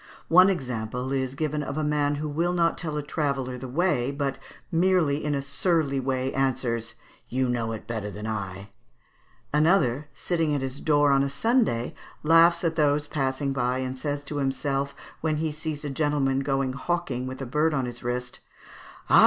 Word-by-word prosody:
One 185 +3 +8
example 125 - -2
is 130 -1 -1
given 150 0 -1
of 140 0 -4
a 155 - 0
man 145 -1 +1
who 150 +1 -3
will 165 +4 0
not 170 -1 +2
tell 155 -3 -4
a 150 - -2
traveller 140 -4 -1
the 130 +1 -6
way, 140 -3 +1
but 140 -1 -2 0.3
merely 165 -4 +2
in 150 -1 0
a 140 - -2
surly 150 -2 +1
way 130 0 -1
answers, 120 -4 -1 0.3
"You 130 +1 +1
know 120 -2 -1
it 110 -1 -6
better 110 -2 -3
than 105 +1 -7
I" 105 -3 -2
(Fig. 95 +1 -9
67). 100 - -17 0.8
Another, 150 -4 +3
sitting 165 -4 0
at 140 - -1
his 135 +1 -4
door 145 -2 +3
on 135 0 +4
a 140 - +1
Sunday, 225 - +1 0.3
laughs 165 +2 +5
at 165 -1 +1
those 145 -1 +3
passing 135 -2 -1
by, 125 -1 0
and 130 0 -3
says 145 +1 -3
to 145 +1 -5
himself 140 0 -1 0.3
when 155 -1 0
he 155 0 -1
sees 155 -1 -5
a - - -2
gentleman 135 -2 +1
going 135 -1 0
hawking 140 -4 -2
with 130 0 -6
a 135 - -4
bird 150 +6 +2
on 135 -4 0
his 120 -1 -7
wrist, 125 +1 -3 0.7
"Ah! - - +7
140 Hz, 190 wpm, -26 LUFS, 130-155 Hz, 0.8 s, One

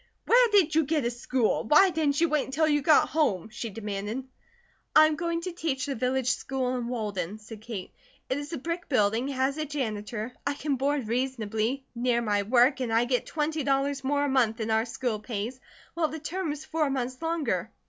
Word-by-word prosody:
"Where - - +6
did 395 -7 +4
you 320 -1 +3
get 300 -3 0
a 240 - +1
school? 240 -1 0
Why 335 - +6
didn't 300 -4 +1
you 335 - +4
wait 300 -2 +1
until 310 +4 +1
you 295 -1 +2
got 305 +2 +5
home?" 220 - 0
she 230 0 -5
demanded. 210 +3 -4 0.7
"I 310 - +9
am 310 0 +1
going 335 +1 -2
to 365 - -4
teach 315 -6 -2
the 285 - -2
village 255 +1 0
school 260 -1 -2
in 245 -2 -3
Walden," 210 -5 -3
said 215 0 -11
Kate. 215 -5 -7 0.3
"It 260 - -1
is 290 +2 -7
a 330 - -3
brick 335 +6 -4
building, 225 -1 +2
has 270 +1 0
a 310 - -1
janitor, 225 -4 -4
I 285 - -1
can 285 -1 -1
board 275 -2 0
reasonably, 235 +1 -1
near 240 0 +1
my 205 -2 +1
work, 245 +6 +4
and 250 -3 -2
I 230 +2 +3
get 250 0 0
twenty 310 0 -1
dollars 275 0 0
more 285 +2 +1
a - - 0
month 245 -5 +2
than 220 -1 -2
our 220 +1 +2
school 235 -2 -2
pays, 225 +3 -4 0.3
while 335 -2 +1
the 315 - -6
term 320 +2 -3
is 300 +1 -6
four 310 -3 0
months 255 0 -3
longer." 285 - -1
265 Hz, 210 wpm, -27 LUFS, 230-300 Hz, 0.7 s, I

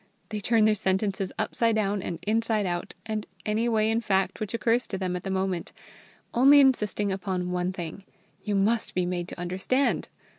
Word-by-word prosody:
They 215 -1 -3
turn 220 +1 +3
their 215 - +5
sentences 190 -1 0
upside 230 -1 +1
down 205 -2 0
and 170 - -4
inside 220 -1 +1
out, 175 -1 -3
and 215 -1 -3 0.2
any 220 +3 +1
way 215 -1 +2
in 225 +1 +1
fact 190 -3 0
which 215 +1 -3
occurs 235 +1 +1
to 190 - -4
them 185 -1 -2
at 180 - -3
the 195 - -5
moment, 190 -2 -2 0.6
only 275 +4 +7
insisting 210 -7 +2
upon 185 -1 -2
one 180 0 0
thing: 180 +1 -7 0.4
you 205 - -1
must 220 +4 +1
be 180 -1 +1
made 175 -1 -2
to - - -9
understand. 190 +10 0
200 Hz, 185 wpm, -27 LUFS, 185-220 Hz, 0.6 s, only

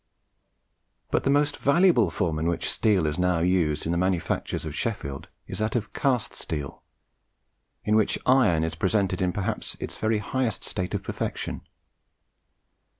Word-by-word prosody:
But - - +1
the - - +3
most 145 +1 +2
valuable 140 - +4
form 80 -1 -1
in 80 - 0
which 85 - -1
steel 100 -7 +2
is 75 +2 -1
now 90 -1 +2
used 85 -4 +1
in 80 - 0
the 85 - +1
manufactures 90 -3 -1
of 75 - -4
Sheffield 75 -7 -4 0.2
is - - -6
that 110 +2 -1
of 110 -3 -2
cast 130 -5 0
steel, 75 -4 -5 1.0
in 105 - +2
which 110 -1 +2
iron 120 -12 +4
is 80 0 -1
presented 95 +2 0
in 90 -1 +2
perhaps 105 +4 -3
its - - -6
very 110 0 +1
highest 120 +3 -2
state 90 -1 -3
of - - -3
perfection. - - -4
95 Hz, 155 wpm, -26 LUFS, 85-115 Hz, 1.0 s, valuable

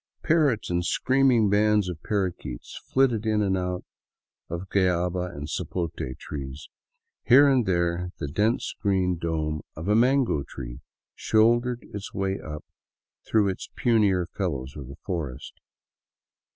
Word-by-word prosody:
Parrots 145 - +2
and 85 0 +1
screaming 130 +2 +3
bands 105 0 +3
of 85 -3 -5
parrakeets 95 - -3 0.2
flitted 125 -5 +3
in 105 -1 +2
and 95 -1 +1
out 90 -1 -3 0.6
of 85 +3 -5
guayaba 90 -1 +1
and 70 +1 -6
sapote 85 +1 -3 0.2
trees; 70 0 -7 0.5
here 140 +4 +7
and 130 -6 +3
there 85 -1 0
the 75 - -4
dense 105 - 0
green 95 -3 +2
dome 80 -2 -2
of 80 +4 -6
a 105 - +3
mango 125 - +3
tree - - -8 0.3
shouldered 120 +2 +2
its 100 -1 -7
way 95 0 -1
up 75 -1 -7 0.6
through 105 -2 +3
its 95 - -4
punier 105 -6 +3
fellows 70 -9 -3
of 70 -4 -8
the 70 +2 -10
forest. 80 -9 -4
95 Hz, 135 wpm, -26 LUFS, 85-110 Hz, 0.6 s, here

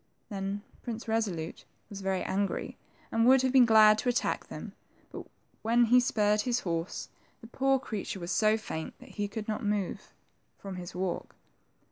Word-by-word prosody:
Then 195 0 -4 0.2
Prince 230 -2 -6
Resolute 200 -8 -2 0.2
was 200 -1 -8
very 190 -1 -1
angry, 195 +1 -2 0.4
and 225 +1 +3
would 260 0 +6
have 260 - +2
been 255 -2 +6
glad 215 -1 +7
to 250 - 0
attack 245 - 0
them, - - -8 0.4
but - - -8 0.3
when 235 +2 +4
he 245 +2 +6
spurred 210 -3 +2
his 245 +1 0
horse, 165 -1 -3 0.3
the - - -13
poor 270 +3 +2
creature 210 -6 -5
was 175 +1 -4
so 215 +4 +3
faint 160 -7 -6
that - - -15
he 205 -1 -3
could 210 +1 -6
not 215 -1 -2
move 205 -2 -2 0.5
from 195 -2 -7
his 175 -1 -8
walk. 185 -1 -3
215 Hz, 170 wpm, -30 LUFS, 195-230 Hz, 0.5 s, glad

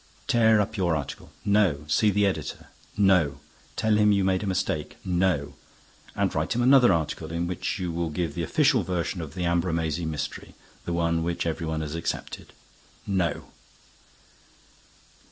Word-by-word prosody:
"Tear 110 -2 +4
up 105 +2 -1
your 90 -4 +1
article." 70 -3 -6
"No." 100 -8 +2
"See 105 +8 +3
the 105 0 +2
editor." 95 - -3 0.3
"No." 90 -9 +3 0.4
"Tell 110 -1 +2
him 105 0 +4
you 100 -1 +2
made 95 -1 +1
a 105 - -3
mistake." 95 -5 -2
"No." 90 -5 0 0.6
"And - - 0
write - - -1
him 120 - +1
another 130 -3 +6
article, 80 -1 -2
in 85 +1 -1
which 90 +3 -3
you 90 -3 -3
will 85 0 -2
give 80 0 -2
the 85 - -3
official 135 - +3
version 90 0 -2
of 80 -1 -8
the 90 - -3
Ambrumésy 85 -2 0
mystery, 75 -2 -5 0.3
the 85 - -2
one 85 -1 +1
which 85 +1 -2
every 80 0 -2
one 80 0 -2
has 75 -1 -4
accepted." 85 0 -5 0.5
"No." 95 -6 -1
85 Hz, 160 wpm, -26 LUFS, 80-100 Hz, 0.6 s, another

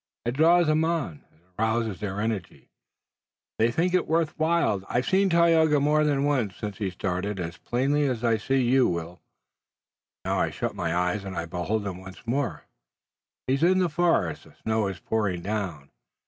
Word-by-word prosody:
It 120 - +1
draws 165 +6 +4
them 155 +1 +2
on, 160 - -2
it 80 - -30 0.2
arouses 110 -3 0
their 100 -1 -4
energy, 105 -4 -4 0.9
they 115 +1 +4
think 175 +9 0
it 180 - +2
worth 160 0 +1
while. 160 - +2
I've 125 +1 0
seen 195 +1 +3
Tayoga 165 -3 +4
more 150 +2 +3
than 145 -2 +1
once 130 -10 0
since 105 -1 -6
he 100 -3 -1
started, 95 +2 -3
as 85 -1 -5
plainly 140 +4 0
as 125 -3 -2
I 115 -2 +3
see 135 +4 +1
you, 130 +1 +4
Will. 85 0 -5 1.0
Now, - - 0
I - - +1
shut - - -3
my 85 -4 -2
eyes 90 +3 0
and 95 -2 -6
I 85 - -2
behold 90 +5 -2
him 95 -2 -5
once 95 +2 -12
more. 120 - -2 0.8
He's 135 +2 0
in 180 +3 +4
the 180 -2 +2
forest. 155 - +1
The - - -19
snow 110 -2 +1
is 95 -2 -5
pouring 100 -6 -1
down. 95 -9 -4
115 Hz, 180 wpm, -26 LUFS, 95-150 Hz, 1.0 s, draws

